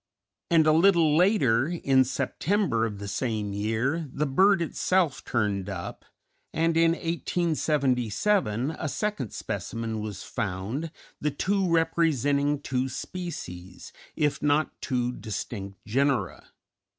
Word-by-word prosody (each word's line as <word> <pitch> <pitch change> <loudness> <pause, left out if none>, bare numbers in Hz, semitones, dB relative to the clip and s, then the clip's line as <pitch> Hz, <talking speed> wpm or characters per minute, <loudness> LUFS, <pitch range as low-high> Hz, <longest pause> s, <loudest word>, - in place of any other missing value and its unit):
And 165 -3 +5
a 155 - +5
little 165 -2 +4
later, 155 - +3
in 135 -6 +3
September 135 - 0
of 105 -2 -7
the 100 0 -7
same 105 -1 -2
year, 115 +10 -1
the 150 +3 -1
bird 190 +8 +4
itself 170 -2 0
turned 105 -4 -1
up, 90 -3 -6 0.5
and 165 +1 +1
in 165 0 +4
1877 155 - 0
a 155 - -2
second 175 - -2
specimen 115 -1 -4
was 105 -3 -5
found, 110 - -3 0.3
the 150 - 0
two 190 +6 0
representing 145 -4 +2
two 130 -1 -1
species, 95 - -7 0.2
if 150 -1 0
not 150 +1 +2
two 125 -3 -1
distinct 100 -4 -6
genera. 120 -4 0
140 Hz, 115 wpm, -27 LUFS, 110-165 Hz, 0.5 s, And